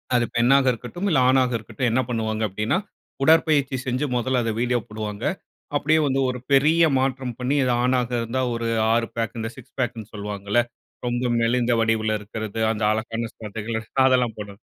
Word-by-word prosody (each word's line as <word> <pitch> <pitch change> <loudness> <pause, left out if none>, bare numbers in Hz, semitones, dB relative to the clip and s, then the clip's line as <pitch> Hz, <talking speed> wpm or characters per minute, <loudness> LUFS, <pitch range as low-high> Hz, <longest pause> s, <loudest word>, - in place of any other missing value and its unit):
அது 120 -1 +3
பெண்ணாக 130 +3 +4
இருக்கட்டும் 125 - -5
இல்ல, 150 - +4
ஆணாக 130 -1 +3
இருக்கட்டும் 115 +3 -2
என்ன 130 - +2
பண்ணுவாங்க 110 -2 -1
அப்டின்னா, 105 - 0 0.5
உடற்பயிற்ச்சி 155 -3 +4
செஞ்சு 130 +4 0
மொதல 125 +1 +1
அத 115 - 0
வீடியோ 125 0 +1
போடுவாங்க. 105 0 -5 0.5
அப்படியே 155 +2 +2
வந்து 135 0 +1
ஒரு 125 0 -4
பெரிய 155 +5 +5 0.2
மாற்றம் 130 -2 -2
பண்ணி 125 +3 0
இது 125 - +1
ஆணாக 125 -1 +1
இருந்தா 115 +3 -2
ஒரு 115 0 -2 0.3
6 115 0 +1
பேக் 115 0 -2
இந்த 115 0 -3
6 130 0 -14
பேக்னு 115 -4 -3
சொல்வாங்கல்ல 100 +2 -1 0.5
ரொம்ப 120 +1 -1
மெலிந்த 120 +1 +2
வடிவுல 110 -1 +1
இருக்கிறது 110 +1 -6
அந்த 110 -1 -3
அழகான 115 +1 -2
சதைகள் 110 +1 -4 0.3
அதெல்லாம் 125 -3 +2
போடுறது 105 0 -8
120 Hz, 165 wpm, -23 LUFS, 110-130 Hz, 0.5 s, பெரிய